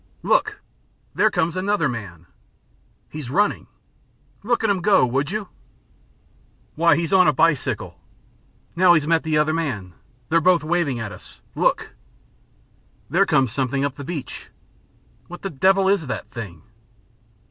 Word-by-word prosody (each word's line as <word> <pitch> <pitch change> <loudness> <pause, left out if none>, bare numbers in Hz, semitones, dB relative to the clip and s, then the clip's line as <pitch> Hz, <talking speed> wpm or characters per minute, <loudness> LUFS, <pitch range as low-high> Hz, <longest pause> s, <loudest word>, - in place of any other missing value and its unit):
"Look! - - +1 0.5
There - - +3
comes 165 0 -1
another 185 -3 0
man!" 100 - -7 0.8
"He's 150 -5 -8
running." 205 +9 0 0.7
"Look 235 +1 0
at 220 - +2
him 190 -2 -1
go, 200 -8 +4
would 135 +4 -1
you." 210 -1 -4 1.2
"Why, 165 -1 +3
he's 165 +2 -2
on 185 -3 +6
a 150 - +4
bicycle. 155 0 0 0.8
Now 175 0 +5
he's 155 -2 +1
met 165 +1 +2
the 155 -1 -1
other 150 +1 +2
man. 120 - -3 0.4
They're 165 +1 +3
both 175 -1 +3
waving 155 -6 -1
at 110 -3 -5
us. - - -13
Look!" - - 0 1.2
"There 190 +5 +3
comes 135 - +2
something 135 +2 -1
up 140 - -2
the 140 - -9
beach." 145 -4 -7 0.8
"What 175 - -11
the 195 - -4
devil 190 +6 +3
is 195 -6 +1
that 125 - -6
thing?" 95 -9 -8
155 Hz, 145 wpm, -22 LUFS, 135-185 Hz, 1.2 s, on